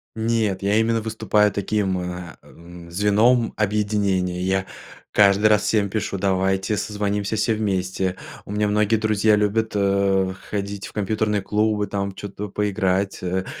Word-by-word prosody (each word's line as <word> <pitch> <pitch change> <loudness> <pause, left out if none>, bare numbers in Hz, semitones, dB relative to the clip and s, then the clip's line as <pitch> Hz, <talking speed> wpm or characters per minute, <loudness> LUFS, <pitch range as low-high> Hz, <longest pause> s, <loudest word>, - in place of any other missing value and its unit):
Нет, 110 -4 0
я 100 +1 +1
именно 115 0 +1
выступаю 105 -1 +1
таким, 100 -1 -1
э, 90 -1 -6
м, 85 0 -13
звеном 105 +6 +3
объединения, 100 -4 0
я 95 +1 0 0.4
каждый 100 +1 +5
раз 105 -1 +3
всем 105 -1 +1
пишу: 100 -1 -2
"Давайте 95 +2 0
созвонимся 105 +1 -2
все 110 +1 +1
вместе". 95 -3 -1 0.3
У - - -9
меня 105 0 0
многие 105 +1 +2
друзья 110 0 +2
любят, 105 +2 0
э, 100 -1 +2 0.2
ходить 100 -1 -4
в - - -14
компьютерные 105 0 0
клубы, 105 +1 0
там 100 -1 -3
чё-то 100 +1 -7
поиграть. 100 -2 -1
Э, 95 +1 -1
100 Hz, 140 wpm, -22 LUFS, 95-105 Hz, 0.4 s, каждый